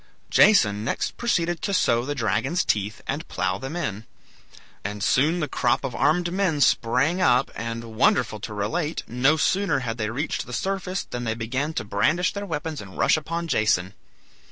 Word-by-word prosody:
Jason 105 Hz, -, +5 dB
next -, -, -2 dB
proceeded 175 Hz, -8 st, 0 dB
to 200 Hz, -, -1 dB
sow 120 Hz, -8 st, +2 dB
the 145 Hz, +1 st, -3 dB
dragon's 115 Hz, -, 0 dB
teeth 105 Hz, +1 st, -1 dB
and 145 Hz, +5 st, -4 dB
plough 95 Hz, +1 st, -1 dB
them 135 Hz, +6 st, -6 dB
in. 110 Hz, -, -4 dB, 0.8 s
And 100 Hz, 0 st, -4 dB
soon 160 Hz, +7 st, +2 dB
the 150 Hz, -, -1 dB
crop 120 Hz, -1 st, +1 dB
of 135 Hz, -3 st, -3 dB
armed 175 Hz, +2 st, +1 dB
men 185 Hz, -6 st, +1 dB
sprang 130 Hz, +9 st, +2 dB
up, 125 Hz, -8 st, +3 dB
and, 115 Hz, 0 st, -5 dB
wonderful 110 Hz, -1 st, +2 dB
to 105 Hz, -, -6 dB
relate! 150 Hz, +11 st, -2 dB
no 130 Hz, +6 st, +2 dB
sooner 190 Hz, -2 st, +1 dB
had 115 Hz, -1 st, -4 dB
they 105 Hz, -1 st, -1 dB
reached 140 Hz, +8 st, -3 dB
the 125 Hz, -, -8 dB
surface 190 Hz, +4 st, -2 dB
than 120 Hz, 0 st, -6 dB
they 110 Hz, -1 st, -1 dB
began 130 Hz, +7 st, -2 dB
to -, -, -1 dB
brandish 155 Hz, -, +1 dB
their 200 Hz, 0 st, -5 dB
weapons 160 Hz, -, -4 dB
and 95 Hz, -2 st, -11 dB
rush -, -, +4 dB
upon 165 Hz, +2 st, -3 dB
Jason. 100 Hz, -, +1 dB
130 Hz, 180 wpm, -24 LUFS, 110-170 Hz, 0.8 s, Jason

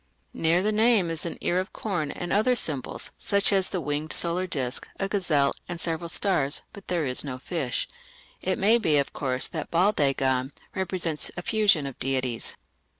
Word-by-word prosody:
Near 170 Hz, +3 st, +2 dB
the 215 Hz, -, +2 dB
name 215 Hz, -5 st, +3 dB
is 165 Hz, +1 st, +1 dB
an -, -, -6 dB
ear 180 Hz, -, +1 dB
of 185 Hz, -, -5 dB
corn, 175 Hz, -9 st, -2 dB
and 175 Hz, +3 st, -4 dB
other 235 Hz, +5 st, +3 dB
symbols, 145 Hz, -, -1 dB
such 200 Hz, 0 st, +1 dB
as 190 Hz, -1 st, +2 dB
the 185 Hz, -, -2 dB
winged 150 Hz, 0 st, -3 dB
solar 175 Hz, +2 st, +1 dB
disc, 130 Hz, -6 st, -3 dB
a 195 Hz, -, 0 dB
gazelle, 165 Hz, -9 st, +1 dB, 0.2 s
and 175 Hz, -1 st, -5 dB
several 165 Hz, 0 st, -3 dB
stars, 165 Hz, -7 st, +1 dB
but 200 Hz, -2 st, -12 dB
there 175 Hz, -4 st, 0 dB
is 125 Hz, -1 st, +1 dB
no 130 Hz, -3 st, -5 dB
fish. 135 Hz, -2 st, -2 dB, 0.5 s
It 185 Hz, 0 st, 0 dB
may 220 Hz, +4 st, +4 dB
be, 160 Hz, -9 st, +2 dB
of 140 Hz, -, 0 dB
course, 130 Hz, -3 st, 0 dB
that -, -, -5 dB
Baal 180 Hz, +5 st, +3 dB
dagon 135 Hz, -3 st, +1 dB, 0.2 s
represents 180 Hz, -4 st, +2 dB
a 175 Hz, -, -4 dB
fusion 205 Hz, -9 st, +3 dB
of 135 Hz, -2 st, -7 dB
deities. 130 Hz, -3 st, -1 dB
170 Hz, 185 wpm, -26 LUFS, 140-190 Hz, 0.5 s, may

